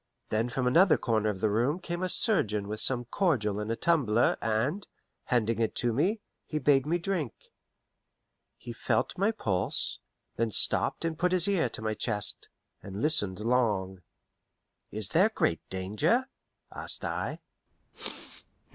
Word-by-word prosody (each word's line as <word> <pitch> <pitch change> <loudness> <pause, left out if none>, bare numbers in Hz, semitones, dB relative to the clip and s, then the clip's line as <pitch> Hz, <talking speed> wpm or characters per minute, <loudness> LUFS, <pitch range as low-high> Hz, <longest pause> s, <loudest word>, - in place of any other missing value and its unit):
Then 110 +3 0
from 125 +1 -2
another 170 +9 +5
corner 110 -2 0
of 95 -3 -4
the 110 - +2
room 125 - +1
came 175 -1 -5
a 185 - -1
surgeon 105 - +1
with 105 +1 -4
some 120 -2 +1
cordial 120 - 0
in 105 +1 -4
a 115 - 0
tumbler, 120 -6 +2
and, 125 - -1 0.4
handing 115 -3 +1
it 115 -2 0
to 120 -2 0
me, 190 - +1 0.3
he 155 - -3
bade 140 -1 +3
me 170 +3 +1
drink. 175 - -4 1.1
He 120 - -8
felt - - -1
my 200 +3 +1
pulse; 105 - 0 0.4
then 115 0 +1
stopped 110 - +1
and 165 -1 -3
put 180 +1 +2
his 180 -1 +5
ear 185 -10 +1
to 110 - -6
my 110 0 -1
chest, 105 -1 -1 0.3
and 100 0 -7
listened 105 - +2
long. 105 -6 0 0.9
"Is 105 -2 0
there 185 - +4
great 85 - 0
danger?" 105 - 0 0.5
asked - - -3
I. - - -3
120 Hz, 150 wpm, -29 LUFS, 105-165 Hz, 1.1 s, another